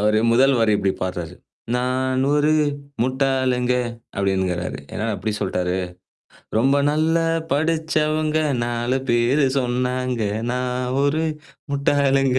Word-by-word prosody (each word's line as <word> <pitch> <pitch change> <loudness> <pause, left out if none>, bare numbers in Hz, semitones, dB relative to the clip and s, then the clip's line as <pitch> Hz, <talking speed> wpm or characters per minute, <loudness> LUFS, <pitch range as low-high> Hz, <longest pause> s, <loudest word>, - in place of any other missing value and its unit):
அவரு 105 +1 +3
முதல் 135 +3 +5
வரி 110 -1 +3
இப்பிடி 95 -1 0
பாடுறாரு. 90 -2 -4 0.4
நானொரு 130 +4 +1 0.5
முட்டாளுங்க 130 -1 +1 0.4
அப்பிடின்கிறாரு. 95 -2 -1 0.2
என்னா 105 - -2
இப்பிடி 105 +3 -3
சொல்ட்டாரு? 90 0 -1 0.8
ரொம்ப 135 +5 +3 0.2
நல்ல 155 +2 +1 0.4
படிச்சவங்க, 155 0 +1 0.3
4 120 +2 -1
பேரு 120 +4 +3
சொன்னாங்க 125 -1 -1 0.3
நான் 125 0 -2
ஒரு 155 +3 +1 0.5
முட்டாளுங்க. 135 -2 +2
125 Hz, 95 wpm, -22 LUFS, 120-140 Hz, 0.8 s, முதல்